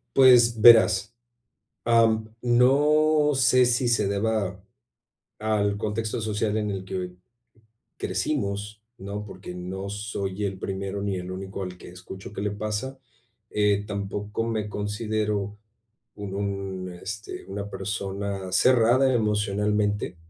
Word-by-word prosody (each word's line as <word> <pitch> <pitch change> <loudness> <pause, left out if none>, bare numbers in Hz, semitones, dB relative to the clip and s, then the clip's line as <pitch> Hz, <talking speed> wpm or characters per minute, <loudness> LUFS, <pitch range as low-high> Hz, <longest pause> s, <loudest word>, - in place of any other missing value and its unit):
Pues, 120 -4 +6
verás, 115 -1 +6 0.7
am, 115 -1 +3
no 150 +5 +4
sé 130 -1 +4
si 120 +1 +2
se 115 -4 +2
deba 100 -2 -1 0.8
al 105 -2 +1
contexto 110 +2 -2
social 110 0 -1
en 105 -1 -1
el 95 -1 -4
que 90 -1 -5 0.8
crecimos, 105 +1 -2 0.2
¿no?, 100 +2 -6
porque 95 -3 -9
no 95 +2 -6
soy 100 -1 -3
el 95 -1 -3
primero 95 +1 -4
ni 100 -2 -2
el 90 0 -6
único 95 +1 -6
al 90 -1 -7
que - - -12
escucho 90 +2 -10
que 100 - -6
le 105 0 -1
pasa, 110 +6 -4 0.5
eh, 105 -1 +2
tampoco 105 +1 -3
me 110 -2 -2
considero 105 -1 -2 0.6
u 105 - -9
un, 100 -1 -4
este, 105 +1 -6
una 100 +1 -5
persona 100 0 -4
cerrada 130 +1 +4
emocionalmente, 105 -2 0
105 Hz, 120 wpm, -25 LUFS, 100-110 Hz, 0.8 s, Pues